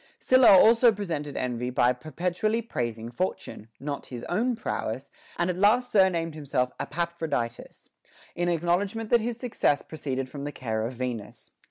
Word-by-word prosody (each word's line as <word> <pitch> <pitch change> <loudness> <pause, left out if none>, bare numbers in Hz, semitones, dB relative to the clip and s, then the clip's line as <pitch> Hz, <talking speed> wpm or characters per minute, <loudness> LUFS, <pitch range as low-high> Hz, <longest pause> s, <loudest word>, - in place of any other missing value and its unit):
Sylla 255 -1 +5
also 230 +4 +6
prevented 160 -9 -4
envy 125 -1 -2
by 125 0 +3
perpetually 180 - -2
praising 120 - -4
Fortune, 175 - -4
not 145 0 -5
his 120 -2 -7
own 240 +7 0
prowess; 130 - -4 0.3
and 175 - +1
at 180 -1 -1
last 235 +6 +3
sur 190 -3 +5
named 165 -2 -2
himself 135 -4 -1
Epaphroditus, 160 -8 -3 0.5
in 175 0 -1
acknowledgment 185 +6 0
that 240 -1 +5
his 230 +1 -3
success 230 - 0
proceeded 135 -4 -4
from 140 +2 -8
the 145 +1 -4
care 110 -5 -3
of 125 - -7
Venus. 120 -3 -6
160 Hz, 155 wpm, -27 LUFS, 125-205 Hz, 0.5 s, also